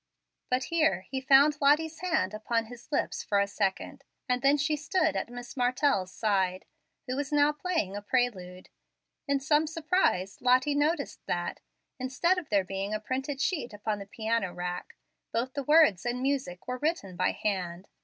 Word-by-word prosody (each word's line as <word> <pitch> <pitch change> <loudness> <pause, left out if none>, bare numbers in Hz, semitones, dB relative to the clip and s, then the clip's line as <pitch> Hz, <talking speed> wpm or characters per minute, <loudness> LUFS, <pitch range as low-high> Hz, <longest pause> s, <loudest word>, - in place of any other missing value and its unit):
But 255 +1 +1
here 320 - +1
he 260 +8 -5
found 280 +3 +5
Lottie's 310 +3 +3
hand 325 - 0
upon 230 +2 -1
his 245 +5 -13
lips 285 - -1
for 200 - +1
a 200 - +3
second, 195 -1 -2 0.2
and 250 -1 +1
then 275 +3 +4
she 305 +2 +1
stood 305 - 0
at 195 - -2
Miss 245 0 -9
Martell's 250 -6 +1
side, 190 -3 0 0.4
who 255 - -3
was 280 +1 -3
now 295 0 +4
playing 300 - -2
a 205 - -4
prelude. 200 -6 -2 0.6
In 280 0 +2
some 295 +3 +2
surprise, 310 - 0
Lottie 255 +3 +3
noticed 300 +4 0
that, - - -2 0.4
instead 310 +9 +1
of 340 - -12
there 200 -2 +3
being 195 +2 -3
a - - -2
printed 265 +5 -3
sheet 310 - -1
upon 210 0 -2
the 200 - -8
piano 220 -3 -1
rack, 175 0 -5 0.4
both 245 +3 -1
the 285 - -2
words 295 - +5
and 245 +1 -2
music 265 -11 -2
were 250 0 -3
written 295 - -2
by - - +2
hand. 185 -3 -3
250 Hz, 175 wpm, -29 LUFS, 200-295 Hz, 0.6 s, found